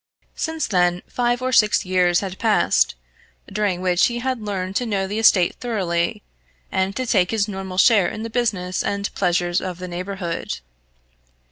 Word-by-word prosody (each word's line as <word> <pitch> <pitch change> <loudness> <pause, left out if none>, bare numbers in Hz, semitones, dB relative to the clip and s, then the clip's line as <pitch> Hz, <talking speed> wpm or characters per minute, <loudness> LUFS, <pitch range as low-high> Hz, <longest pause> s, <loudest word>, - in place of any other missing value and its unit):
Since 320 -1 -2
then 180 -2 +1
five 245 0 -1
or 255 - 0
six 215 -4 +4
years 180 -1 +2
had 190 -2 -6
passed, 220 - +2 0.5
during 195 -3 -1
which 180 -1 +3
he 240 - -3
had 255 -1 -2
learned 195 -2 -4
to 245 - -2
know 195 -3 0
the 205 +3 -3
estate 190 -5 +4
thoroughly, 180 - -1 0.5
and 190 +1 0
to 255 - -2
take 185 -7 +2
his 220 -2 0
normal 190 -2 -6
share 205 -3 +5
in 215 - -5
the 230 - -4
business 200 -7 -1
and 200 0 -2
pleasures 175 -1 +1
of 185 -2 -5
the 180 0 -6
neighbourhood. 180 - -4
195 Hz, 165 wpm, -22 LUFS, 180-225 Hz, 0.5 s, share